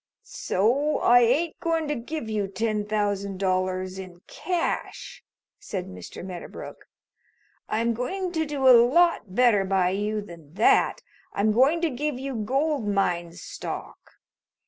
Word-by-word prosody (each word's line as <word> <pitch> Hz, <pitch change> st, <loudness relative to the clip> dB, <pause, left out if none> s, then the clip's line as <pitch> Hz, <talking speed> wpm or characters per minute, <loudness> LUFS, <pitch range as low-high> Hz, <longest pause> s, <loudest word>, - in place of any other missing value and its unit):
"So 260 Hz, +10 st, 0 dB
I 245 Hz, +1 st, +5 dB
ain't 280 Hz, +8 st, +1 dB
going 330 Hz, -2 st, -1 dB
to 295 Hz, -, 0 dB
give 270 Hz, 0 st, -5 dB
you 210 Hz, -2 st, -1 dB
ten 210 Hz, +1 st, -2 dB
thousand 205 Hz, -2 st, -1 dB
dollars 185 Hz, 0 st, -1 dB
in 180 Hz, -2 st, -10 dB
cash," 355 Hz, -2 st, -4 dB, 0.4 s
said 190 Hz, -3 st, -5 dB
Mr. 90 Hz, -, -9 dB
Medderbrook. 180 Hz, -2 st, -9 dB, 0.8 s
"I'm 230 Hz, +2 st, +1 dB
going 360 Hz, -, -3 dB
to 320 Hz, -3 st, -1 dB
do 280 Hz, -2 st, 0 dB
a 255 Hz, -, +10 dB
lot 255 Hz, -, +2 dB
better 235 Hz, -5 st, +4 dB
by 190 Hz, -1 st, +1 dB
you 210 Hz, +2 st, -1 dB
than 165 Hz, -6 st, -13 dB
that. 225 Hz, -, +3 dB, 0.3 s
I'm 210 Hz, +2 st, +2 dB
going 270 Hz, +9 st, +3 dB
to 335 Hz, -3 st, +1 dB
give 290 Hz, +2 st, -2 dB
you 270 Hz, +1 st, -5 dB
gold 270 Hz, +3 st, -1 dB
mine 175 Hz, -4 st, 0 dB
stock. 175 Hz, -, -8 dB
220 Hz, 140 wpm, -25 LUFS, 190-280 Hz, 0.8 s, a